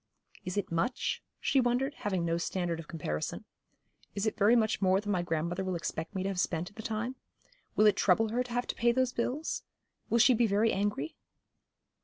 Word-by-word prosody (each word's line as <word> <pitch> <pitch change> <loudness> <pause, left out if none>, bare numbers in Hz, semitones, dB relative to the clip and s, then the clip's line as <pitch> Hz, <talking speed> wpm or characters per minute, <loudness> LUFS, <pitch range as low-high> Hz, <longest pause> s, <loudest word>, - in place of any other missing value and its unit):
'Is 185 +2 -4
it 205 - -1
much?' 255 - -1 0.2
she 270 - +3
wondered, 250 +3 +1
having 190 -9 -2
no 165 0 +1
standard 175 -1 -2
of 160 - -8
comparison. 75 - -4 0.7
'Is 200 +1 -1
it 220 - 0
very 215 +3 +5
much 220 -3 +2
more 190 0 +4
than 205 0 -3
my 185 -3 +1
grandmother 170 +2 -1
will 185 -1 -2
expect 165 +1 -4
me 185 - -1
to 195 - -1
have 190 -2 -2
spent 175 -1 -1
in - - -25
the 220 - -6
time? 230 +4 -3 0.6
Will 215 - +5
it 210 - +5
trouble 215 +4 +3
her 240 +3 0
to 245 - -11
have 245 +1 0
to - - -3
pay 235 0 +3
those 255 0 +1
bills? 265 +7 -2 0.5
Will 235 - +3
she 245 +2 +6
be 235 0 +3
very 210 +2 +3
angry?' 195 -7 -1
205 Hz, 210 wpm, -31 LUFS, 180-235 Hz, 0.7 s, she